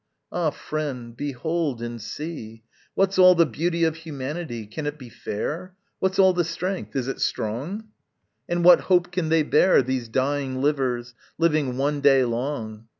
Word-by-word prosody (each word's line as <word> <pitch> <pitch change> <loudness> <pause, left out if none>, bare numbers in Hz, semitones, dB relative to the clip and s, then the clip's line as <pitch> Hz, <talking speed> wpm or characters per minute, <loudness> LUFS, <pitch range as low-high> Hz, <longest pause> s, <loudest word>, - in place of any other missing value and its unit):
Ah 170 -3 +1
friend, 135 -6 -5
behold 145 +1 -2
and 120 -1 -5
see! 115 -4 -7 0.3
What's 195 0 +2
all 185 0 +8
the 170 -1 +5
beauty 170 +2 -1
of 160 -1 +1
humanity? 150 -5 -5
Can 145 +9 -5
it 145 +1 -3
be 130 -4 -11
fair? 165 - -5 0.2
What's 190 0 0
all 190 -1 +6
the 175 -1 +1
strength? 180 +2 -4
is 130 -2 -1
it 135 - -4
strong? 150 - -2 0.6
And 175 0 0
what 180 - +9
hope 180 -1 +3
can 175 -3 -1
they 160 -1 +4
bear, 150 +1 +4
These 125 -2 -2
dying 135 +1 -1
livers 130 -4 0 0.2
living 150 -6 +1
one 145 +2 0
day 135 -2 +5
long? 115 -3 -4
145 Hz, 160 wpm, -24 LUFS, 125-170 Hz, 0.6 s, what